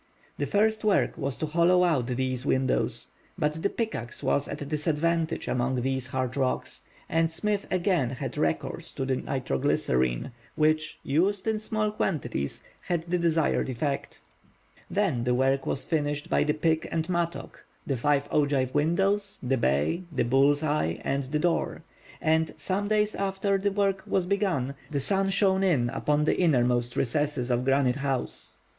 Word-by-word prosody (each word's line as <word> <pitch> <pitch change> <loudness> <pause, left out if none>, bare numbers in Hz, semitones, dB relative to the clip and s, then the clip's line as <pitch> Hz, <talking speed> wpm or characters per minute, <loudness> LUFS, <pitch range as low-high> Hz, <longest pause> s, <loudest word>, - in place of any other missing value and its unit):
The 145 - 0
first 215 +7 +2
work 210 -2 +2
was 140 -2 -3
to - - -2
hollow 170 +3 +3
out 145 -9 +2
these 130 0 -1
windows. 130 -2 0 0.3
But 150 +2 -1
the 200 - +1
pickaxe 135 - -3
was 140 - +1
at 145 - -5
a - - -7
disadvantage 160 +2 0
among 125 0 0
these 130 -1 -1
hard 130 -1 -2
rocks, 130 -2 -1 0.3
and 165 0 +2
Smith 205 +5 -2
again 180 - +1
had 125 - -5
recourse - - -2
to 135 - -3
the 130 -1 0
nitro 125 - -2
glycerine, 65 - +1 0.2
which, 155 0 +1
used 185 +8 +1
in 220 -1 +1
small 215 0 -1
quantities, 120 - -2 0.2
had 170 -2 -2
the 175 +1 -1
desired 165 -5 +1
effect. 135 +3 -3 0.7
Then 180 - 0
the 125 0 +1
work 135 +1 +1
was 135 - -1
finished 150 0 -1
by - - +3
the 150 +1 +1
pick 160 0 +1
and 165 -1 -1
mattock—the 170 -5 -4
five 145 +3 +1
ogive 140 -3 +1
windows, 195 +7 +1
the 130 +1 +1
bay, 75 - +1
the 140 - +1
bull's 140 +5 +3
eyes, 145 - 0
and 140 0 -1
the 145 +4 -1
door—and, 160 -1 -1
some 200 +2 -2
days 210 0 +2
after 195 0 0
the 200 +1 +1
work 195 -1 +1
was 185 -2 +1
begun, 180 -9 0 0.2
the 145 - -1
sun 195 +7 +1
shone 195 0 +2
in 135 -11 +2
upon 150 +2 +1
the 155 - +2
innermost 125 -7 +2
recesses 135 -1 0
of 120 +1 +1
Granite 135 -1 +2
House. 135 -2 -3
150 Hz, 160 wpm, -27 LUFS, 130-180 Hz, 0.7 s, hollow